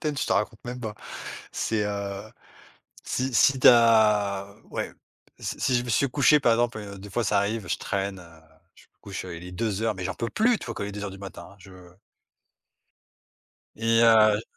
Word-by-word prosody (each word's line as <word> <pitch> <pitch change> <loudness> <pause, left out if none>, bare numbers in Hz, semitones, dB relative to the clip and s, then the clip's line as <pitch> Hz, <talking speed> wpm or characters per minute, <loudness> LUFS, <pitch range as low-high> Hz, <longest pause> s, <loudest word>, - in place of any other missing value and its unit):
quarantaine, 150 -3 -2
je - - -1
te - - +1
raconte 105 +2 -1
même 125 +1 -6
pas. 110 -3 -5 0.6
C'est, 110 -2 -1
heu, 100 -1 -4 0.8
si 130 -1 -2
si 135 +2 +4
tu - - +4
as, 105 -4 +4 0.2
ouais, - - -4 0.5
si - - -5
si 130 - +1
je 120 - 0
me - - -8
suis 130 +5 +2
couché, 145 +3 +4
par 120 - +4
exemple, 120 0 +1
heu, 100 -2 -8
des 100 +1 -10
fois, 120 +4 -1
ça 100 0 +2
arrive, 100 -1 -2
je - - 0
traîne, 100 0 -3
heu, 85 -2 -16 0.3
je - - -20
me - - -49
couche, 100 -1 -7
heu, 90 -2 -7
il 85 - -10
est 90 - -8
2:00 110 +2 -1
mais 95 -1 -6
j'en 95 - -3
peux 115 +3 -3
plus, 225 +1 +2
tu - - -9
vois, 115 - -5
quand 100 - -4
il - - -4
est 100 - -7
2:00 105 -1 -5
du 95 - -11
matin, 95 -1 -9
hein, 100 - -18
je 95 +1 -15 2.0
Et 115 +1 +2
heu 110 -2 +5
105 Hz, 215 wpm, -26 LUFS, 100-115 Hz, 2.0 s, heu